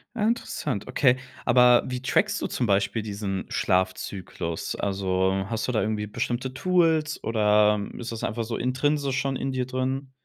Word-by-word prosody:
Ja, 215 Hz, -2 st, +1 dB
interessant, 150 Hz, -, -2 dB
okay. 130 Hz, -3 st, +4 dB, 0.3 s
Aber 125 Hz, 0 st, +6 dB
wie 125 Hz, -1 st, -4 dB
trackst 130 Hz, -, +1 dB
du -, -, -1 dB
zum 125 Hz, -, -1 dB
Beispiel 105 Hz, +2 st, +1 dB
diesen 100 Hz, -2 st, -4 dB
Schlafzyklus? 95 Hz, -2 st, -2 dB
Also, 95 Hz, -1 st, 0 dB
hast 115 Hz, +1 st, -2 dB
du -, -, +2 dB
da 110 Hz, -, +1 dB
irgendwie 105 Hz, -1 st, -1 dB
bestimmte 125 Hz, +4 st, -3 dB
Tools, 160 Hz, -1 st, +1 dB
oder 105 Hz, -1 st, +3 dB, 0.2 s
ist 120 Hz, -1 st, -5 dB
das 115 Hz, -, -4 dB
einfach 115 Hz, +1 st, -2 dB
so 115 Hz, +1 st, -4 dB
intrinsisch 135 Hz, +2 st, 0 dB
schon 135 Hz, -1 st, -1 dB
in 135 Hz, -, -3 dB
dir 130 Hz, -1 st, -1 dB
drin? 130 Hz, +1 st, -3 dB
120 Hz, 165 wpm, -26 LUFS, 105-130 Hz, 0.3 s, Aber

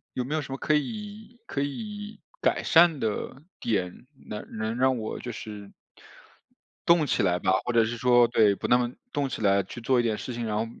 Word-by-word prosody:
有 125 Hz, -, -1 dB
没 150 Hz, +4 st, -2 dB
有 155 Hz, -, 0 dB
什 135 Hz, -, -9 dB
么 135 Hz, -, -3 dB
可 155 Hz, -, 0 dB
以 215 Hz, -, -5 dB
可 140 Hz, -, -3 dB
以 210 Hz, +8 st, -5 dB, 0.2 s
改 -, -, +1 dB
善 165 Hz, -3 st, +5 dB
的 115 Hz, +5 st, -3 dB, 0.2 s
点， 95 Hz, -1 st, -2 dB, 0.2 s
能 105 Hz, -, -6 dB
能 110 Hz, +2 st, -2 dB
让 130 Hz, 0 st, +3 dB
我 110 Hz, -1 st, -4 dB
就 120 Hz, -, -5 dB
是 105 Hz, -3 st, -8 dB, 1.2 s
动 170 Hz, -3 st, +5 dB
起 -, -, +1 dB
来 90 Hz, -2 st, +2 dB
吧。 95 Hz, 0 st, +1 dB
或 120 Hz, -, -1 dB
者 115 Hz, -1 st, +4 dB
是 120 Hz, +2 st, -3 dB
说 120 Hz, 0 st, +5 dB
对， 110 Hz, -4 st, +4 dB
不 -, -, -4 dB
那 125 Hz, -, +5 dB
么 120 Hz, 0 st, -1 dB, 0.2 s
动 140 Hz, -2 st, 0 dB
起 125 Hz, -, -5 dB
来 100 Hz, -1 st, +4 dB
去 110 Hz, +6 st, -9 dB
做 125 Hz, +1 st, +2 dB
一 -, -, +2 dB
点 110 Hz, -2 st, 0 dB
事 125 Hz, -, -5 dB
情， 120 Hz, -1 st, -3 dB
然 105 Hz, -1 st, -1 dB
后 110 Hz, +1 st, 0 dB
120 Hz, 235 characters per minute, -27 LUFS, 110-145 Hz, 1.2 s, 善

